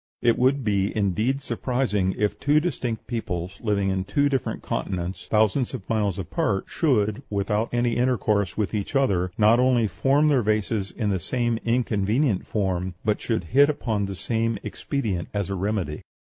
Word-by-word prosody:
It 120 -1 +3
would 130 +2 +3
be 100 -2 +1
indeed 110 +7 0
surprising 115 -6 0
if 105 -1 0
two 145 +1 +3
distinct 125 -9 -3
peoples, 95 -6 -4
living 100 -3 +1
in 95 0 -1
two 145 +8 +1
different 135 -2 -2
continents, 90 -1 -3
thousands 110 +5 +2
of 105 -7 -9
miles 105 -5 0
apart, 100 - -1
should, 110 -9 +1
without 105 +2 -1
any 120 -1 +1
intercourse 110 -6 +1
with 105 0 -1
each 105 +5 -3
other, 95 -10 +2
not 110 +2 +5
only 125 -2 +3
form 135 - +2
their 140 -4 +4
vases 105 -2 0
in 105 -4 -2
the 95 - 0
same 120 +4 -1
inconvenient 115 -1 +1
form, 95 -3 -1
but 105 -1 +1
should 110 -6 -1
hit 140 +2 +6
upon 110 -8 -1
the 100 - -5
same 115 +2 -1
expedient 105 - -3
as 100 -1 -1
a - - -1
remedy. 95 -5 -2
110 Hz, 165 wpm, -24 LUFS, 100-125 Hz, -, hit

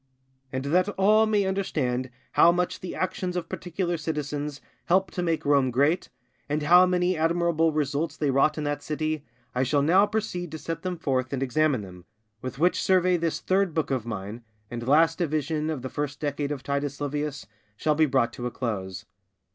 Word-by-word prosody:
And 130 +1 -3
that 180 +7 +2
all 215 +3 +5
may 210 -2 +2
understand 135 -10 -1 0.2
how 170 - +6
much 180 +1 -1
the 185 - -6
actions 185 -1 -2
of 175 -2 -3
particular 175 0 -3
citizens 150 -2 -3 0.3
helped 185 0 +2
to 180 - -2
make 165 -2 -1
Rome 140 -2 +3
great, 145 +8 +1 0.4
and 150 +1 0
how 180 +4 +7
many 180 0 +1
admirable 165 0 +2
results 150 +1 -1
they 145 -3 +1
wrought 140 +4 +3
in 155 - -2
that 145 0 -2
city, 155 0 -2 0.3
I 125 - 0
shall 140 +2 +2
now 185 +7 +5
proceed 180 -6 -3
to - - -3
set 165 +1 -5
them 180 -1 -3
forth 130 -5 -1
and 135 0 -1
examine 135 -1 +1
them; 90 -2 -12 0.4
with 130 -1 -6
which 175 +5 +2
survey 185 -1 +3
this 165 -2 -1
Third 190 -3 +1
Book 160 -3 0
of 125 -4 -1
mine, 105 +1 -5 0.3
and 120 0 -5
last 160 +4 +4
division 155 -1 -1
of 150 -6 -3
the - - -2
First 145 +1 -4
Decade 145 -1 -2
of 140 -3 -4
Titus 140 0 -2
Livius, 145 0 -3 0.3
shall 155 +6 +2
be 155 +1 +3
brought 130 -4 +1
to 125 - -4
a - - -2
close. 105 -6 -4
150 Hz, 190 wpm, -26 LUFS, 135-175 Hz, 0.4 s, how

